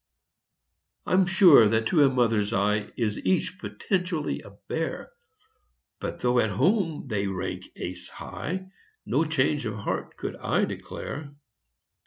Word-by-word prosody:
I'm 185 0 +3
sure 180 - +7
that 110 +1 +1
to 155 -5 +5
a 140 - +6
mother's 115 -4 +1
eye 105 0 +1
Is 110 -4 -1
each 190 +1 0
potentially 180 -7 -2
a - - -12 0.2
bear. - - -3 0.9
But - - -5
though 125 0 +3
at 110 - +2
home 165 - +1
they 100 -4 -1
rank 95 -1 -4
ace 90 0 -6
high, 185 +3 -6 0.3
No 145 +7 +1
change 150 -3 +1
of 110 - -4
heart 100 - -4
could - - -4
I - - +1
declare. 145 0 -7
135 Hz, 135 wpm, -26 LUFS, 110-175 Hz, 0.9 s, sure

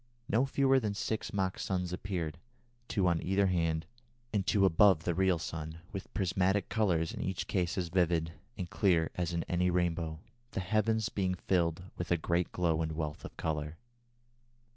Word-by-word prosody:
No 125 +6 +2
fewer 135 0 +4
than 105 -4 -2
six 110 +1 -2
mock 95 -2 -1
suns 90 -2 -2
appeared, 90 -5 -3 0.5
two 95 -4 +1
on 85 -2 +2
either 95 +2 +2
hand 80 -3 +1 0.5
and 100 -2 0
two 100 -2 +4
above 95 -2 +5
the 85 - 0
real 95 0 +3
sun, 80 0 -5
with 100 -2 -6
prismatic 95 +1 +1
colours 90 -8 +1
in - - -5
each 95 -1 -2
case 90 -2 -1
as 90 -2 -1
vivid, 85 -2 +1 0.2
and 90 -3 -3
clear 85 -4 +2
as 90 -1 -2
in 85 -1 -1
any 90 +1 +1
rainbow, 85 -2 0 0.4
the - - -1
heavens 110 +3 +1
being 95 -4 0
filled 85 -2 0
with 90 - -4
a 85 - +3
great 85 +2 0
glow 85 -3 +1
and 80 -1 -1
wealth 75 -2 -4
of - - -9
colour." 75 0 -2
90 Hz, 175 wpm, -32 LUFS, 80-95 Hz, 0.5 s, above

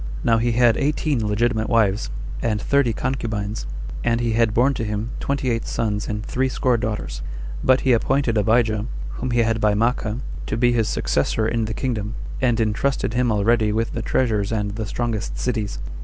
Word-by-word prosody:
Now 115 -1 +3
he 120 +1 +1
had 120 -1 +4
eighteen 145 -5 0
legitimate 110 +1 +1
wives, 105 - +2 0.3
and 105 -2 0
thirty 140 +1 +2
concubines; 110 - -3 0.4
and 115 0 +2
he 120 -1 0
had 115 -1 +3
born 125 +6 +3
to 115 - -3
him 105 +2 -3
twenty 135 -2 -1
eight 115 0 -2
sons 105 -2 -1
and 105 0 -3
threescore 130 -1 +1
daughters; 105 - -3 0.4
but 130 0 +4
he 130 - +3
appointed 130 +1 +1
Abijah, 110 0 +2 0.3
whom 130 - -2
he 120 -1 +3
had 115 -1 0
by 105 -1 +3
Maachah, 115 +1 0 0.3
to 110 - -1
be 120 +1 +4
his 115 -2 +1
successor 110 -1 0
in 115 0 0
the 110 +1 -4
kingdom, 110 -5 -2 0.3
and 120 -3 +2
intrusted 115 +3 0
him 125 -1 +2
already 110 +1 +2
with 115 +2 0
the 115 - -2
treasures 110 -4 0
and 105 -2 -1
the 110 +1 -4
strongest 115 -2 -3
cities. 110 - -2
115 Hz, 180 wpm, -22 LUFS, 105-120 Hz, 0.4 s, had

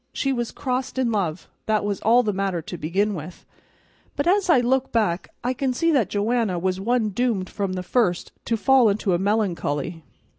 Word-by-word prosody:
"She 275 -1 0
was 240 -2 -2
crossed 260 0 -3
in 255 -3 +1
love, 185 -6 -2 0.2
that 215 -1 +1
was 205 -1 -2
all 235 +3 +4
the 210 -2 -1
matter 190 -2 -1
to 175 - -7
begin 190 +6 0
with; 170 0 -8 0.7
but 285 - -1
as 380 +2 +2
I 335 - +6
look 255 +2 +1
back, 205 -7 0
I 250 +1 0
can 260 0 -1
see 330 +5 +2
that 260 -9 +2
Joanna 215 -2 0
was 185 +2 -1
one 230 +1 +1
doomed 210 -3 -1
from 195 -2 -2
the 185 -1 -4
first 180 -4 0
to 230 - 0
fall 260 -1 +5
into 200 -2 0
a 175 - +1
melancholy. 175 -6 -1
215 Hz, 195 wpm, -23 LUFS, 185-250 Hz, 0.7 s, I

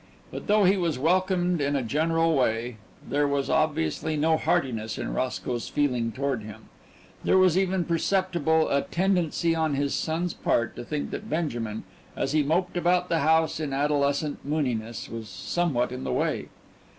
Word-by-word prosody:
But - - -7
though 210 0 +4
he 195 +2 +4
was 170 -6 0
welcomed 180 +2 +1
in 145 0 0
a 135 - 0
general 165 +6 +1
way 120 -2 0 0.3
there 145 +1 +1
was 140 -1 -1
obviously 155 - 0
no 160 +2 +3
heartiness 115 -7 -1
in - - -4
Roscoe's 125 -2 -2
feeling 125 -6 0
toward 135 -1 -2
him 105 -1 -11 0.5
there - - +4
was 185 -3 +5
even 190 -2 +1
perceptible 170 -2 +1
a 140 - +2
tendency 175 -2 +1
on 160 -3 0
his 140 0 0
son's 165 +2 -1
part 115 -1 0
to - - -6
think 150 +3 -4
that - - -6
Benjamin, 120 -9 -2 0.3
as - - -1
he 155 0 +3
moped 175 +5 0
about 180 +1 +2
the 165 - +2
house 160 +1 +2
in 150 -3 -3
adolescent 145 +1 0
mooniness, 125 -6 -2
was 115 -2 -7
somewhat 130 - -1
in 130 +1 -5
the - - -2
way. - - -1
150 Hz, 165 wpm, -26 LUFS, 130-170 Hz, 0.5 s, was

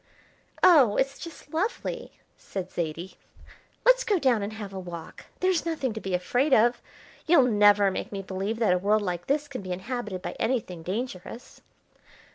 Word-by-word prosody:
"Oh, 275 - +6
it's 275 +1 0
just 330 -3 -11
lovely," 385 +8 -3 0.2
said 185 -2 -6
Zaidie. 170 +2 -4 0.7
"Let's - - +5
go 415 -5 +2
down 255 -9 +2
and 205 +2 -4
have 205 -3 -7
a 190 - -5
walk. 170 -3 -9 0.2
There's 370 -2 +2
nothing 310 -8 -2
to 220 - -6
be 190 -2 -1
afraid 250 +10 +2
of. 240 +2 +3 0.5
You'll 320 -6 +6
never 205 -3 +5
make - - -5
me 195 -1 -5
believe 195 +4 -3
that 220 -5 +3
a 180 - +1
world 210 +3 +2
like 175 -2 -3
this 295 +1 0
can 270 -5 -6
be 185 -1 -7
inhabited 205 0 -4
by - - -3
anything 225 -8 -1
dangerous." 215 +4 -6
215 Hz, 170 wpm, -27 LUFS, 190-270 Hz, 0.7 s, Oh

